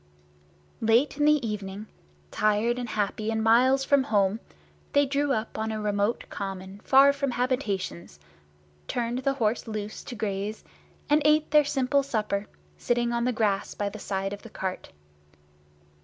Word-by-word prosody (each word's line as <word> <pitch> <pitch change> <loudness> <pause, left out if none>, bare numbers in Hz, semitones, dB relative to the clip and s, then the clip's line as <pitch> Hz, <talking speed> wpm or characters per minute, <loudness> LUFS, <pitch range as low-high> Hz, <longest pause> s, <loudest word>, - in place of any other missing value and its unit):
Late 230 +6 +3
in 295 - +2
the 300 -5 +3
evening, 205 -1 -5 0.5
tired 215 +3 +1
and 240 -2 -4
happy 215 +1 -2
and 220 0 -1
miles 255 +4 +4
from 275 -1 +3
home, 205 0 +1 0.5
they 285 0 +4
drew 280 +1 0
up 220 -3 -2
on 220 0 -2
a 215 - -3
remote 205 +1 0
common 195 0 -6
far 275 +5 +6
from 280 -1 -2
habitations, 225 - -2 0.7
turned 240 +1 -2
the 275 +1 0
horse 230 -2 0
loose 215 -1 -5
to 245 - -7
graze, 205 0 -3 0.4
and 300 +1 +3
ate 305 0 +3
their 300 -1 +6
simple 275 0 +1
supper 210 -6 -2 0.3
sitting 240 0 0
on 235 0 0
the 250 - +2
grass 210 -4 -1
by 205 -1 -2
the 215 +1 -9
side 195 0 -3
of 205 - -8
the 230 - -11
cart. 190 -2 -5
225 Hz, 155 wpm, -27 LUFS, 205-265 Hz, 0.7 s, far